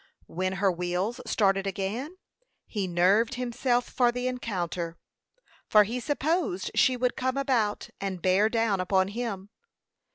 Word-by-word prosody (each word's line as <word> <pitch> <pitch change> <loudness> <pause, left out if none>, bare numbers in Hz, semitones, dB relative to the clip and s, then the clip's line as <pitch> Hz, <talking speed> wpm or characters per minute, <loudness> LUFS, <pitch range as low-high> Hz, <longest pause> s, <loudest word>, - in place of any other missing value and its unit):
When 185 +2 -2
her 195 0 +2
wheels 180 +7 -2
started 195 -3 +2
again, 220 - -3 0.5
he 200 -4 -3
nerved 195 +8 +3
himself 245 0 0
for 245 -2 +2
the 245 +1 -2
encounter; 180 -9 -3 0.7
for 210 -1 +7
he 235 +5 -3
supposed 290 - -1
she 260 -2 +3
would 245 0 0
come 260 +1 -1
about, 245 -7 0
and 195 -2 -3
bear 190 +5 +3
down 225 -4 +1
upon 190 +1 +2
him. 205 -3 -5
210 Hz, 135 wpm, -27 LUFS, 190-250 Hz, 0.7 s, for